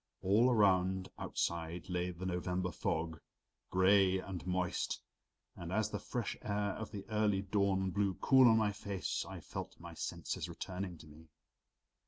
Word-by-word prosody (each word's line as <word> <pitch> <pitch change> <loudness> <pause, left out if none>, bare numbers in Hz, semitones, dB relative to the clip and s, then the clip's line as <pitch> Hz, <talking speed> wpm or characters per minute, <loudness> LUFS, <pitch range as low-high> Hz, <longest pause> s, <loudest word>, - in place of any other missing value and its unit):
All 105 +7 +5
around 95 -4 +3
outside 85 0 -2
lay 90 0 -1
the 90 +1 -6
November 90 0 -1
fog, 80 0 -2 0.5
gray 95 0 +5
and 95 -1 -6
moist, 90 -1 -1 0.6
and 85 0 -6
as 110 +2 +1
the - - -2
fresh 120 -4 -3
air 105 -1 -1
of 110 +2 -5
the 100 -2 -7
early 105 -2 +2
dawn 95 -1 +1
blew 100 -1 +1
cool 130 -2 +6
on 110 -1 +6
my 110 -2 +2
face 100 -2 -3
I - - -7
felt - - -7
my - - -9
senses - - -4
returning 90 -1 -5
to 80 - -14
me. 80 +2 -15
95 Hz, 155 wpm, -35 LUFS, 90-105 Hz, 0.6 s, cool